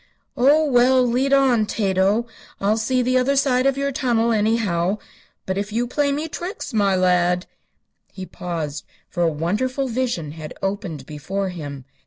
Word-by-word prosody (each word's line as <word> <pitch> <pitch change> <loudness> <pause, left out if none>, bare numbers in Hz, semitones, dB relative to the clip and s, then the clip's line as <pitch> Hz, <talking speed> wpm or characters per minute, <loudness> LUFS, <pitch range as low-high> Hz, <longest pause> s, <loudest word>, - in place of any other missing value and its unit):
"Oh, 290 +5 +4
well; 255 -1 +4
lead 255 +3 +1
on, 260 -6 +4
Tato. 200 +2 +1 0.3
I'll 205 +2 +2
see 250 +3 +1
the 255 +1 +2
other 270 +2 +1
side 265 -1 +2
of 275 0 +1
your 280 0 0
tunnel, 235 -4 +1
anyhow. 210 -4 +1 0.5
But 190 +1 -2
if 205 +1 -4
you 235 +3 0
play 280 +3 0
me 300 +3 -2
tricks, 350 - -6
my 200 -3 +2
lad 180 -1 +2 0.3
" - - -53 0.3
He 190 -1 -7
paused, 160 -6 -5 0.3
for 175 - -3
a 170 - +4
wonderful 215 - -1
vision 235 - -2
had 155 -1 -9
opened 195 -8 -3
before 190 +7 -4
him. 145 -7 -7
220 Hz, 165 wpm, -22 LUFS, 180-255 Hz, 0.5 s, Oh